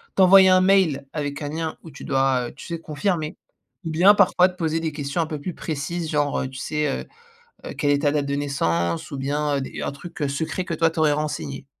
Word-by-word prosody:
t'envoyer 190 Hz, 0 st, +7 dB
un 185 Hz, 0 st, +5 dB
mail 185 Hz, -8 st, +3 dB
avec 145 Hz, -2 st, -4 dB
un 145 Hz, -, -3 dB
lien 160 Hz, +1 st, -4 dB
où 165 Hz, -, -11 dB
tu -, -, -11 dB
dois, 135 Hz, -2 st, +1 dB
heu, -, -, -14 dB
tu -, -, -11 dB
sais, 170 Hz, -2 st, -4 dB
confirmer. 160 Hz, +1 st, -2 dB, 0.5 s
Ou -, -, -2 dB
bien 180 Hz, +6 st, +6 dB
parfois 185 Hz, -2 st, +5 dB
te 180 Hz, -, -13 dB
poser 165 Hz, -2 st, 0 dB
des 160 Hz, -1 st, -2 dB
questions 145 Hz, +2 st, -3 dB
un -, -, 0 dB
peu 155 Hz, -2 st, -5 dB
plus 180 Hz, +4 st, -4 dB
précises 160 Hz, +2 st, -4 dB
genre, 145 Hz, -1 st, 0 dB
heu, -, -, -2 dB
tu 130 Hz, 0 st, -9 dB
sais, 150 Hz, +1 st, -1 dB
heu, -, -, -10 dB, 0.6 s
heu, -, -, -6 dB
quelle 145 Hz, -, 0 dB
est 140 Hz, -, +2 dB
ta 145 Hz, -, +3 dB
date 145 Hz, -1 st, 0 dB
de 140 Hz, -, -1 dB
naissance 85 Hz, -13 st, -1 dB
ou 140 Hz, -, -5 dB
bien, 145 Hz, +2 st, -1 dB
heu, -, -, -2 dB
des -, -, -6 dB
un -, -, -2 dB
truc, 155 Hz, +5 st, -11 dB
heu, 145 Hz, -, +1 dB
secret 160 Hz, +6 st, -3 dB
que 180 Hz, -, -5 dB
toi 165 Hz, +1 st, +3 dB
tu 165 Hz, -, -8 dB
aurais 155 Hz, -1 st, +4 dB
renseigné. 145 Hz, -2 st, -3 dB
150 Hz, 250 wpm, -23 LUFS, 140-170 Hz, 0.6 s, t'envoyer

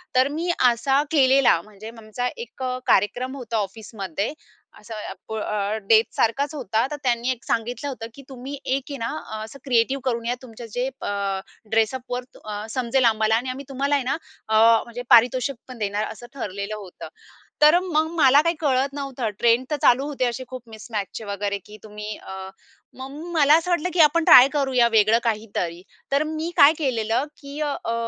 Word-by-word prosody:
तर 255 Hz, +1 st, +5 dB
मी 320 Hz, +5 st, -3 dB, 0.2 s
असा 270 Hz, +4 st, +1 dB
केलेला. 270 Hz, -, +4 dB
म्हणजे 215 Hz, +2 st, -11 dB
आमचा 225 Hz, +3 st, -4 dB
एक 470 Hz, -, -8 dB
अ, 255 Hz, 0 st, -1 dB
कार्यक्रम 250 Hz, +7 st, +2 dB
होता 235 Hz, -4 st, -4 dB
ऑफिसमध्ये. 200 Hz, -, -4 dB, 0.5 s
असं 220 Hz, +1 st, -9 dB
अ, 210 Hz, -, -6 dB
प -, -, -6 dB
अ, 210 Hz, -1 st, -2 dB
डेटसारखाच 230 Hz, +5 st, +2 dB
होता. 230 Hz, -4 st, 0 dB
तर -, -, -2 dB
त्यांनी 240 Hz, -1 st, 0 dB
एक 245 Hz, -2 st, -6 dB
सांगितलं 235 Hz, +4 st, -2 dB
होतं, 230 Hz, -4 st, -6 dB
की 275 Hz, -, -12 dB
तुम्ही 265 Hz, +2 st, -7 dB
एक 270 Hz, +1 st, 0 dB
आहे 280 Hz, -, -5 dB
ना 230 Hz, -2 st, -3 dB, 0.2 s
अ, 215 Hz, 0 st, -4 dB
असं 220 Hz, +6 st, -11 dB
क्रिएटिव्ह 260 Hz, +1 st, +1 dB
करून 235 Hz, -3 st, -1 dB
या. 240 Hz, +1 st, 0 dB
तुमचं 235 Hz, -2 st, -10 dB
जे 250 Hz, +1 st, -1 dB
अ, -, -, -2 dB, 0.6 s
ड्रेसअपवर 245 Hz, +3 st, 0 dB, 0.2 s
अ, 210 Hz, 0 st, -5 dB
समजेल 255 Hz, +1 st, +1 dB
आम्हाला 220 Hz, -1 st, +3 dB
आणि 245 Hz, +3 st, -1 dB
आम्ही 265 Hz, +2 st, -6 dB
तुम्हाला 280 Hz, +2 st, 0 dB
आहे 280 Hz, -, 0 dB
ना 265 Hz, +4 st, -1 dB, 0.3 s
अ, 220 Hz, -, 0 dB, 0.3 s
म्हणजे 240 Hz, +1 st, -8 dB
पारितोषिक 250 Hz, +3 st, +5 dB
पण 255 Hz, -1 st, -10 dB
देणार 210 Hz, 0 st, -2 dB
असं 240 Hz, -, -11 dB
ठरलेलं 200 Hz, -4 st, -5 dB
होतं. 200 Hz, -4 st, -9 dB, 0.5 s
तर 305 Hz, +3 st, +7 dB
मग 320 Hz, -4 st, 0 dB
मला 280 Hz, -1 st, +6 dB
काही 335 Hz, +2 st, 0 dB
कळत 275 Hz, -2 st, +1 dB
नव्हतं. 275 Hz, -5 st, -3 dB
ट्रेंड 235 Hz, +2 st, +3 dB
तर -, -, +2 dB
चालू 255 Hz, +3 st, +4 dB
होते 275 Hz, -3 st, -1 dB
असे 240 Hz, +1 st, -2 dB
खूप 255 Hz, 0 st, -8 dB
मिसमॅचचे 220 Hz, -1 st, -6 dB
वगैरे 200 Hz, 0 st, -2 dB
की 210 Hz, -, -12 dB
तुम्ही 210 Hz, 0 st, -7 dB
अ, 190 Hz, 0 st, -8 dB, 0.5 s
मग 265 Hz, +1 st, -7 dB, 0.2 s
मला 300 Hz, -2 st, +6 dB
असं 335 Hz, +2 st, -3 dB
वाटलं, 350 Hz, 0 st, +1 dB
की 355 Hz, -, -1 dB
आपण 320 Hz, +2 st, +5 dB
ट्राय 255 Hz, +1 st, +9 dB
करूया 265 Hz, -4 st, +3 dB
वेगळं 220 Hz, 0 st, +5 dB
काहीतरी. 210 Hz, -7 st, -2 dB, 0.3 s
तर 280 Hz, +2 st, +3 dB
मी 315 Hz, +1 st, -3 dB
काय 285 Hz, +2 st, +8 dB
केलेलं 235 Hz, -3 st, 0 dB, 0.2 s
की 280 Hz, +1 st, -8 dB
अ, 300 Hz, -, 0 dB, 0.2 s
अ, 230 Hz, -, -1 dB
245 Hz, 185 wpm, -23 LUFS, 220-275 Hz, 0.6 s, ट्राय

